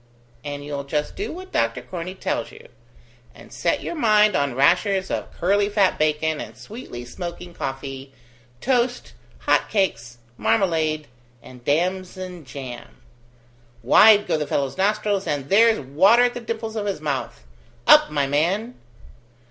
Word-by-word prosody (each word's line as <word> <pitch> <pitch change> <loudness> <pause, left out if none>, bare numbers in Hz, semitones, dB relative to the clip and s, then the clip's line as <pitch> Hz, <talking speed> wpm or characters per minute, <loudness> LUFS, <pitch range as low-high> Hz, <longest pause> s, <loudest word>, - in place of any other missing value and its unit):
"And 145 -1 -6
you'll 145 -1 -4
just 150 +2 -3
do 405 - -4
what 370 +3 -9
Doctor 115 +2 0
Corney 175 +7 -6
tells - - -3
you; - - -15 0.7
and - - -15
set - - -1
your - - -4
mind 215 - +4
on 140 -3 0
rashers 180 +7 +2
of - - -3
curly 200 +3 +1
fat 200 -2 +2
bacon 155 0 0
and - - -9
sweetly 205 - -9
smoking 175 +6 -7
coffee, 135 -1 -6 0.5
toast, 250 -1 0 0.3
hot - - +2
cakes, 190 - -1 0.2
marmalade, 155 - +1 0.4
and 125 -1 -14
damson 180 +2 -2
jam. 130 -2 -9 0.9
Wide 210 -1 +7
go 155 - 0
the 150 - -3
fellow's 140 -2 -1
nostrils, 205 0 0
and 140 -2 -2
there's 225 +3 +5
water 185 - +4
at 245 0 +2
the 245 - -5
dimples 225 -1 -5
of 210 -2 -2
his 195 -5 -2
mouth! 145 -3 -4 0.4
Up, - - +7
my 145 -2 0
man." 175 - 0
175 Hz, 145 wpm, -23 LUFS, 140-210 Hz, 0.9 s, Wide